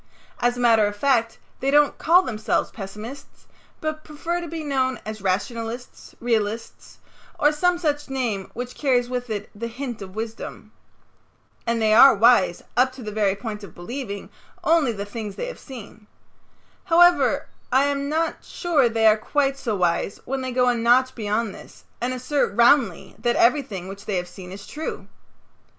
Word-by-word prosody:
As 245 0 +1
a - - -5
matter 225 -3 +4
of 205 - -4
fact, 230 -2 +1 0.2
they 270 - 0
don't 295 +1 +4
call 355 +3 +5
themselves 220 -8 -1
pessimists, 215 +6 -9 0.4
but 310 0 -3
prefer 335 +3 -3
to 340 - -6
be 325 0 -5
known 260 -3 0
as 215 -1 -6
rationalists, 225 +5 -3
realists, 225 -1 -2 0.4
or 295 - +5
some 355 +4 +2
such 295 -4 -1
name 235 -8 -2
which 245 +1 -5
carries 250 -4 +1
with 250 -1 -3
it 210 -1 -4
the 230 +3 -5
hint 240 -1 -6
of 190 0 -9
wisdom. 225 +1 -6 1.0
And 235 0 +1
they 215 -1 +3
are 245 +3 +9
wise 205 -5 +4
up 255 +2 +4
to 260 -1 -10
the 210 - -5
very 205 -2 +1
point 210 0 -6
of 190 - -11
believing 200 +1 -6 0.3
only 320 -6 +3
the 200 -2 -5
things 210 -1 -6
they - - -4
have - - -7
seen. 225 -5 -11 0.8
However, 350 0 +4 0.2
I 260 +2 +5
am 280 0 -1
not 320 +2 -1
sure 305 -9 +1
they 225 -1 +1
are 215 0 +6
quite 275 +4 0
so 240 -6 -2
wise 180 +1 0
when 265 +1 -2
they 255 0 -3
go 250 0 +2
a 245 - +4
notch 245 +2 +3
beyond 215 -1 -2
this - - -14 0.2
and 245 +1 0
assert 255 -2 -1
roundly 240 +2 +3
that 240 0 +1
everything 235 -8 +2
which 195 +1 -9
they 205 - -2
have 180 0 -3
seen 180 0 -11
is 200 +1 -9
true. 310 +2 -6
240 Hz, 175 wpm, -23 LUFS, 215-275 Hz, 1.0 s, are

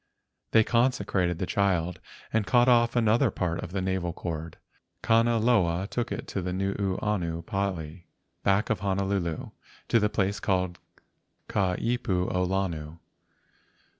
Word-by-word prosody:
They 110 - +5
con¬ 120 +3 +3
secrated 90 -6 -1
the 95 - -2
child, 90 -3 0 0.3
and 110 -3 +1
cut 120 +5 +4
off 120 -1 +4
another 115 +2 +3
part 85 -4 -2
of 85 - -7
the 95 0 -2
navel 95 -2 -1
cord. 80 -2 -5 0.5
Kanaloa 115 -6 +3
took 120 - -2
it - - -4
to 95 - -2
the 90 0 -3
Nuuanu 95 -2 -1
pali 90 -4 -3 0.3
back 100 +3 +2
of 110 - 0
Honolulu, 95 -4 -1 0.4
to 115 - +4
the 105 0 +2
place 100 0 0
called 90 -2 -1 0.7
Ka 95 -2 +1
ipu 110 -6 -1
o 90 - +1
Lono. 85 -4 -2
95 Hz, 135 wpm, -27 LUFS, 90-105 Hz, 0.7 s, They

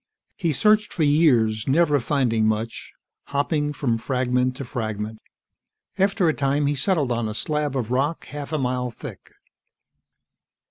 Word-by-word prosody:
He 170 -4 0
searched 210 +8 +3
for 165 - -1
years, 125 -8 +3
never 150 +1 +3
finding 115 -4 +1
much, 110 +1 -3 0.3
hopping 145 +1 0
from 120 -6 -1
fragment 125 0 0
to 135 0 -6
fragment. 110 -2 -4 0.8
After 195 -2 +2
a 160 - +3
time 140 +1 0
he 145 - +2
settled 145 -2 0
on 120 -2 0
a 105 - -5
slab 150 +1 -1
of 120 -2 -3
rock 140 +6 0
half 145 +1 -7
a 155 - 0
mile 125 -2 -1
thick. 115 - -10
135 Hz, 145 wpm, -23 LUFS, 120-150 Hz, 0.8 s, searched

